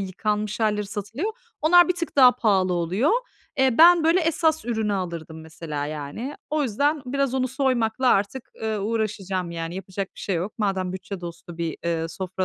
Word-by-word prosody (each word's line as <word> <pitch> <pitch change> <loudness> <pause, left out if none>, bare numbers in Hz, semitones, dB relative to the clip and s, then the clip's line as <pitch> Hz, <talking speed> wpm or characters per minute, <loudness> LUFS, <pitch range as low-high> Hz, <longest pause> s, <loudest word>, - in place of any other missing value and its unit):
yıkanmış 210 +3 -2
hâlleri 210 -1 +1
satılıyor. 225 - -4 0.3
Onlar 350 +2 +6
bir 360 - +2
tık 335 -4 -5
daha 255 -2 +8
pahalı 195 -6 +2
oluyor. 180 - +1 0.5
Eee, 265 -1 +3
ben, 340 0 +8
böyle, 335 +3 +4
esas 320 -1 +1
ürünü 220 -3 -1
alırdım 170 -4 -5
mesela, 160 -2 -5
yani. 155 - -5 0.2
O 305 0 +1
yüzden 285 +4 0
biraz 275 0 0
onu 260 -1 +1
soymakla 255 -2 +1
artık, 205 +4 +1
ııı, 220 -2 -1
uğraşacağım 200 -4 -2
yani 165 0 -5
yapacak 190 0 -5
bir - - -11
şey 195 - -1
yok. 185 +6 -3
Madem 190 -3 -1
bütçe 185 0 -6
dostu 170 0 -9
bir, 165 -3 -2
eee, 165 -1 -1
sofra 185 +2 -3
210 Hz, 175 wpm, -24 LUFS, 180-265 Hz, 0.5 s, daha